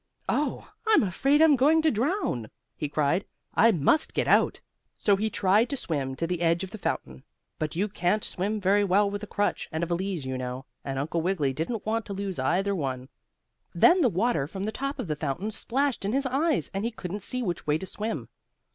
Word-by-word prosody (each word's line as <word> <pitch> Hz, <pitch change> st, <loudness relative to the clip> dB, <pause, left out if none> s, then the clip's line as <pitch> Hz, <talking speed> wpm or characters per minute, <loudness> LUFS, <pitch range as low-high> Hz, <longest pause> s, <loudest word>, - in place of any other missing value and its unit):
"Oh, 295 Hz, -, -1 dB
I'm 440 Hz, -, +5 dB
afraid 275 Hz, -, +3 dB
I'm 310 Hz, -3 st, +6 dB
going 305 Hz, +5 st, +4 dB
to 315 Hz, -, +4 dB
drown!" 235 Hz, -, -1 dB, 0.3 s
he 150 Hz, -, -3 dB
cried. 155 Hz, +6 st, +1 dB, 0.3 s
"I 230 Hz, +2 st, +6 dB
must 180 Hz, -, +2 dB
get -, -, +1 dB
out!" -, -, +3 dB, 0.4 s
So 205 Hz, -, +3 dB
he 215 Hz, +3 st, -1 dB
tried 210 Hz, +4 st, +3 dB
to 280 Hz, -, -2 dB
swim 140 Hz, -, -2 dB
to 165 Hz, -, -2 dB
the 175 Hz, 0 st, -2 dB
edge 170 Hz, +1 st, +2 dB
of 190 Hz, -, -6 dB
the 220 Hz, -, -8 dB
fountain, 65 Hz, -, -3 dB, 0.4 s
but 155 Hz, -1 st, -2 dB
you 195 Hz, +5 st, +1 dB
can't 195 Hz, +1 st, 0 dB
swim 205 Hz, +4 st, -2 dB
very 200 Hz, +1 st, +3 dB
well 200 Hz, +1 st, +3 dB
with 205 Hz, 0 st, -4 dB
a 210 Hz, -, -6 dB
crutch 205 Hz, -, -1 dB
and 160 Hz, +2 st, -2 dB
a -, -, +2 dB
valise, 175 Hz, -2 st, -2 dB
you 130 Hz, 0 st, -3 dB
know, 125 Hz, +1 st, -5 dB, 0.2 s
and 135 Hz, -1 st, -4 dB
Uncle 160 Hz, +5 st, -1 dB
Wiggily 160 Hz, -6 st, 0 dB
didn't 180 Hz, -, -3 dB
want 225 Hz, +1 st, -1 dB
to 200 Hz, -, -4 dB
lose 195 Hz, -4 st, -4 dB
either 190 Hz, +9 st, +1 dB
one. 130 Hz, -6 st, -3 dB, 0.7 s
Then 360 Hz, +1 st, +6 dB
the 255 Hz, -, +4 dB
water 190 Hz, -, +1 dB
from 190 Hz, +4 st, -6 dB
the 215 Hz, -, -1 dB
top 275 Hz, +4 st, -3 dB
of -, -, -4 dB
the 155 Hz, -, -1 dB
fountain 155 Hz, +8 st, -3 dB
splashed 265 Hz, +4 st, 0 dB
in 200 Hz, +3 st, -1 dB
his 275 Hz, +1 st, +1 dB
eyes 285 Hz, +5 st, 0 dB
and 195 Hz, +1 st, -2 dB
he 230 Hz, -, 0 dB
couldn't 205 Hz, -3 st, -6 dB
see 250 Hz, +5 st, -3 dB
which 175 Hz, -7 st, -3 dB
way 150 Hz, +1 st, +3 dB
to 190 Hz, -, -6 dB
swim. 215 Hz, +4 st, -4 dB
195 Hz, 220 wpm, -27 LUFS, 160-230 Hz, 0.7 s, I'm